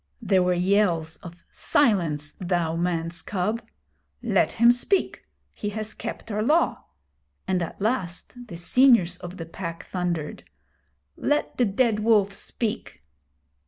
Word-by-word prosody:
There 195 -5 +2
were 180 0 +2
yells 175 -3 +1
of 170 0 -12
'Silence, 170 - +1
thou 175 -3 0
man's 170 -1 -1
cub!' 210 +4 -2 0.6
'Let - - +2
him 235 +1 +6
speak. 245 +11 0 0.3
He 210 - -4
has 215 0 -3
kept - - -7
our 210 +1 -1
Law'; 305 +10 +2 0.6
and 185 -1 +1
at 170 - -5
last 215 +2 -3
the 170 - -8
seniors 185 -2 +4
of 180 +1 -9
the 165 - -6
Pack 165 0 -7
thundered: 175 -4 -3 0.7
'Let 295 0 0
the 245 - +5
Dead 215 +1 +1
Wolf 210 -2 +3
speak.' 210 - -4
190 Hz, 130 wpm, -25 LUFS, 170-220 Hz, 0.7 s, him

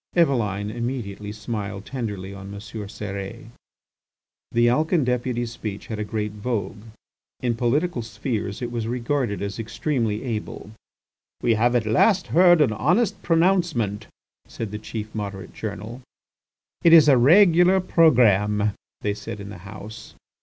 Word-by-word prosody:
Eveline 105 - +1
immediately 115 -4 -4
smiled 105 -2 -5
tenderly 105 -7 -5
on 100 0 -9
M. 100 - -7
Cérès. 100 -1 -7 1.0
The 120 0 +3
Alcan 155 +6 +2
deputy's 120 -1 -1
speech 105 -4 -6
had 110 -2 -5
a - - -1
great 105 0 -3
vogue. 105 -1 -4 0.6
In 120 -2 +1
political 125 +5 0
"spheres" 110 0 -4
it 120 - -3
was 115 -2 -3
regarded 120 -3 -1
as 100 +2 -5
extremely 115 -2 -2
able. 110 -3 -5 0.7
"We 115 - +4
have 120 +3 +2
at 120 -3 +2
last 185 - +3
heard 175 -1 +6
an 125 -7 +3
honest 210 - +1
pronouncement," 165 - +1 0.4
said 110 -3 -6
the 105 - -5
chief 110 0 -6
Moderate 100 -3 -6
journal. 110 +4 -6 0.8
"It 170 - +6
is 160 -3 +8
a 140 - +7
regular 175 +5 +6
programme!" 105 - +3 0.3
they 105 - 0
said 105 0 -7
in 100 0 -8
the 100 -3 -9
House. 105 +2 -10
115 Hz, 140 wpm, -23 LUFS, 105-130 Hz, 1.0 s, is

